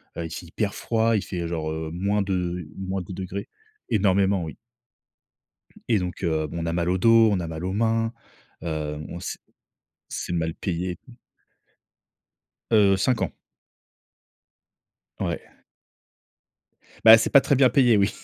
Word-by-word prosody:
heu, 85 - -4
il - - -6
fait 85 - -7
hyper 100 +4 -3
froid, 115 0 +1
il - - -2
fait, 90 - -5
heu, 85 - -3
genre, 80 -2 -3
heu, 80 0 -4
-2, 90 -2 -1
-10° 95 +1 -5 0.4
énormément 100 -2 +2
oui. 80 - -7 1.3
Et 110 - +4
donc 90 +1 -5
heu, 80 -3 0
bon, 85 +3 -6
on - - -3
a - - 0
mal 85 0 0
au 90 - +2
dos, 115 +1 +6
on 100 - +1
a 85 - -4
mal 80 +2 -5
aux 95 - -2
mains, 115 +1 +1 0.5
heu, 75 -2 -3
bon, 80 +3 -7
c'est - - -6 0.7
c'est - - -4
mal 80 -1 -1
payé. 90 -1 -3 1.7
Heu, 100 -3 +5
5 120 +5 +1
ans. - - 0 1.9
Ouais. - - -2 1.7
Bah, 110 0 +11
c'est 115 - 0
pas 140 - +7
très 140 - +2
bien 130 -1 +5
payé 120 -3 +4
oui. 100 +1 +3
95 Hz, 150 wpm, -24 LUFS, 85-110 Hz, 1.9 s, Bah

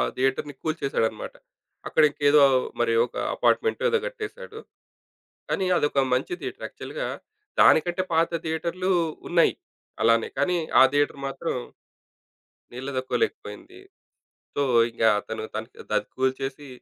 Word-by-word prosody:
థియేటర్‌ని 135 +3 -1
కూల్చేశాడనమాట. 135 -9 -2 0.5
అక్కడ 160 - +3
ఇంకేదో 145 +1 +4 0.4
మరి 120 -1 +2
ఒక - - -15 0.2
అపార్ట్‌మెంటో 450 -1 +1
ఏదో 465 0 +2
గట్టేశాడు. 475 -1 -8 0.9
కానీ 190 - 0
అదొక 140 -3 +2
మంచి 130 - -2
థియేటర్. - - -6
యాక్చువల్‌గా - - -6 0.5
దానికంటే 175 +3 +5
పాత 165 +1 +3
థియేటర్లు 170 +3 -2 0.4
ఉన్నాయి 170 -1 +3 0.5
అలానే. 115 0 +3
కానీ 180 -1 +2 0.2
ఆ - - +10
థియేటర్ 145 -1 +1
మాత్రం 135 +4 -3 1.2
నిలతొక్కోలేకపోయింది. 140 - -4 0.8
సో, - - 0 0.3
ఇంకా 115 0 +1
అతను 110 +1 -6
తనకి 110 +2 -6
దది 105 - 0
కూల్చేసి, 135 +2 -2
145 Hz, 105 wpm, -25 LUFS, 130-175 Hz, 1.2 s, ఆ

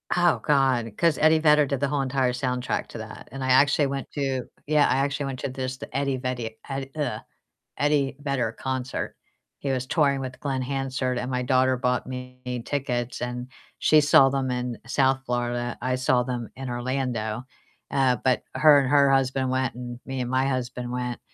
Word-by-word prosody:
Oh, 175 -1 +3
God, 130 -6 +2
'cause 165 -3 +3
Eddie 155 +1 +5
Vedder 150 -1 +5
did 140 -1 -2
the 140 - +1
whole 145 0 0
entire 130 -2 +1
soundtrack 125 0 -2
to - - -9
that, - - -9
and 135 +1 -5
I 130 - -1
actually 140 +2 +5
went 135 -1 -4
to 135 -3 -2 0.2
yeah, 150 -1 +4
I 130 - +2
actually 140 +1 0
went 135 -2 -4
to - - -3
this, 130 0 -4
the 130 - -10
Eddie 140 -1 0
Vedi 125 -3 -4
Ed 135 0 -4
ugh, 130 -8 -2 0.6
Eddie 145 -2 +1
Vedder 140 -6 -1
concert. 130 -1 -3 0.4
He 140 - -3
was 130 -1 -1
touring 140 -1 +2
with 130 -1 -6
Glen 135 -2 -2
Hansard, 130 -1 -2
and 125 +1 -3
my 125 0 0
daughter 130 +1 +3
bought 125 0 0
me 125 -1 -6
tickets, 125 -4 -2
and 125 0 -4 0.3
she 155 - +5
saw 140 -2 +6
them 135 -1 -1
in 125 -1 -3
South 135 0 +2
Florida, 120 -1 -2
I 130 +1 0
saw 130 -1 +2
them 120 -3 -4
in 130 -1 -6
Orlando, 120 -2 -2 0.5
uh, 135 -3 +3
but 130 -2 +2
her 150 -2 +7
and 135 - 0
her 140 -1 +5
husband 130 -1 +2
went, 130 -1 0
and 120 -1 -7
me 135 -1 -3
and 125 - -3
my 130 +1 +2
husband 125 -2 -3
went, 125 -1 -3
130 Hz, 190 wpm, -25 LUFS, 125-140 Hz, 0.6 s, her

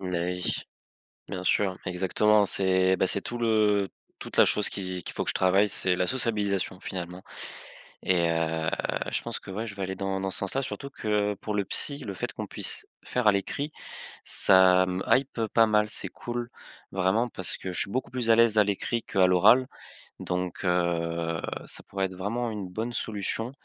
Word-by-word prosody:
Beh 90 -2 -2
oui. 90 - -2 0.8
Bien 95 -2 -5
sûr 95 0 +2
exactement 100 +3 +3
c'est 95 -1 +3
bah, 95 - +2
c'est 100 - +1
tout 120 - -5
le 105 -4 +2 0.3
toute - - -7
la - - +8
chose 105 - +1
qu'il 95 -2 -5
qu'il - - -7
faut - - -2
que - - -2
je - - 0
travaille, 95 +3 +4
c'est 95 -2 +1
la 90 0 0
sociabilisation 100 -5 0
finalement. 90 -1 -6 0.8
Et 85 -2 +3
heu, 80 -1 0 0.4
je - - 0
pense - - -4
que, - - -13
ouais, 110 +4 -3
je 105 - -7
vais 100 - -4
aller 95 0 -3
dans 95 0 -2
dans 95 - -1
ce - - 0
sens-là. 100 +8 -1
Surtout 140 +2 -5
que 105 -5 0
pour 105 - -5
le 100 - +1
psy 140 +8 0
le 105 -8 -6
fait - - -3
qu'on - - -5
puisse - - -3 0.2
faire 125 -3 0
à - - +8
l'écrit 140 +9 -2 0.5
ça 95 -1 +5
me 90 +1 -2
hype 130 -4 +2
pas 115 -1 +6
mal, 105 -1 +2
c'est - - 0
cool 120 0 -5 0.4
vraiment 95 +6 +1
parce 95 -6 -1
que 95 - -5
je - - -3
suis - - -2
beaucoup 130 +5 -2
plus 120 -3 -1
à 115 - +7
l'aise 115 -2 +4
à 105 - +7
l'écrit 105 +3 -1
qu'à 95 -1 +3
l'oral 110 +8 +5 0.5
donc, 90 0 -3
heu, 85 -2 0 0.2
ça - - -5
pourrait 95 0 -2
être 95 - -11
vraiment 115 +6 -2
une 105 -3 -5
bonne 110 +6 -4
solution 110 +1 -3
100 Hz, 195 wpm, -27 LUFS, 90-110 Hz, 0.8 s, la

